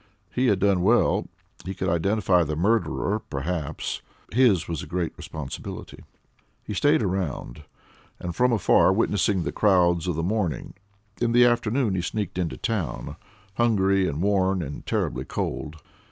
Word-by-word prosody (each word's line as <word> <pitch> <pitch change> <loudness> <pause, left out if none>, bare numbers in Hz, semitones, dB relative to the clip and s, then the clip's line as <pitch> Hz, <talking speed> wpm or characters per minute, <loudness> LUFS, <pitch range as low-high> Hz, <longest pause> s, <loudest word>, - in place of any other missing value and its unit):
He 130 +1 +2
had 105 -4 +3
done 95 -1 +2
well; 115 +6 +3 0.4
he 95 +2 -5
could 95 - -2
identify 90 +2 +2
the 75 -1 -3
murderer 100 +2 +1
perhaps; 75 -2 -4 0.3
his 110 -8 +4
was 80 -4 -3
a - - -8
great 85 +1 -2
responsibility. 70 -4 -7 0.6
He - - -5
stayed 145 +5 +3
around, 80 -7 -3 0.5
and 85 -1 -5
from 125 +3 +3
afar 100 -3 +4
witnessed 100 -2 +1
the - - -2
crowds 90 -4 +3
of 90 - 0
the 80 - -2
morning. 90 - -2 0.5
In 120 -1 +1
the 120 +1 +7
afternoon 120 -1 +1
he 90 - 0
sneaked 100 0 -3
into 85 -3 -2
town, 110 -9 -3 0.4
hungry 100 -5 +3
and 75 +5 -2
worn 95 -2 +2
and 70 -1 -7
terribly - - -1
cold. 75 0 -4
95 Hz, 150 wpm, -25 LUFS, 85-110 Hz, 0.6 s, the